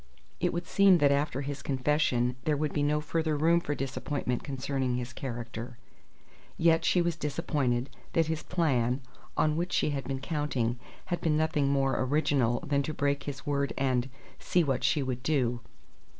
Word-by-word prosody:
It - - +1
would 175 +1 -2
have - - -21
seemed 195 -3 +5
that 140 -1 +5
after 140 -1 0
his 140 0 -5
confession 130 -3 +1
there 150 -2 +2
would 150 0 -1
be 145 - 0
no 150 +1 +2
further 160 0 -1
room 165 +3 +4
for 145 -4 -2
disappointment 135 -2 -2
concerning 135 -2 -2
his 125 0 -4
character; 120 -1 -6 0.8
yet 165 0 +4
she 180 - +3
was 170 -1 0
disappointed 140 -5 -1 0.3
that 165 - +3
his 160 0 -2
"plan," 135 -7 +1 0.4
on 155 -1 +3
which 175 +3 -2
she 150 - +2
had 140 -2 -3
been 135 0 -2
counting, 135 -5 -1 0.3
had 175 - -1
been 155 -2 +2
nothing 155 -3 +1
more 135 -1 +1
original 130 -3 +1
than 140 -1 +1
to 155 +2 -4
break 140 -1 0
his 135 -1 -6
word 140 -1 0
and 130 -1 +1 0.3
"see 180 - +2
what 135 -5 0
she 140 +2 +2
would 125 -1 -3
do." 125 -4 +1
140 Hz, 180 wpm, -29 LUFS, 130-155 Hz, 0.8 s, seemed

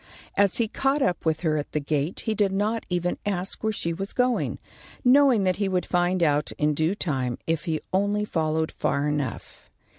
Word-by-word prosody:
As 200 -2 +3
he 230 - +1
caught 270 +5 0
up 175 -2 -1
with 155 -1 +1
her 155 -3 +1
at 145 - -5
the 150 - +1
gate, 150 +3 -2
he 220 - -1
did 205 -2 +1
not 210 +4 -1
even 180 0 -1
ask 195 0 -2
where 220 - +1
she 170 -5 -2
was 195 +4 -5
going, 250 -1 +1 0.5
knowing 255 -4 +5
that 185 -1 +1
he 200 -1 0
would 185 -1 0
find 175 0 +1
out 150 -2 +1
in 150 0 +1
due 160 +6 0
time 130 -10 -2
if 165 0 -1
he 160 -3 -1
only 205 +2 +1
followed 160 -3 -1
far 140 +1 -1
enough. 145 -2 -4
180 Hz, 200 wpm, -25 LUFS, 155-205 Hz, 0.5 s, knowing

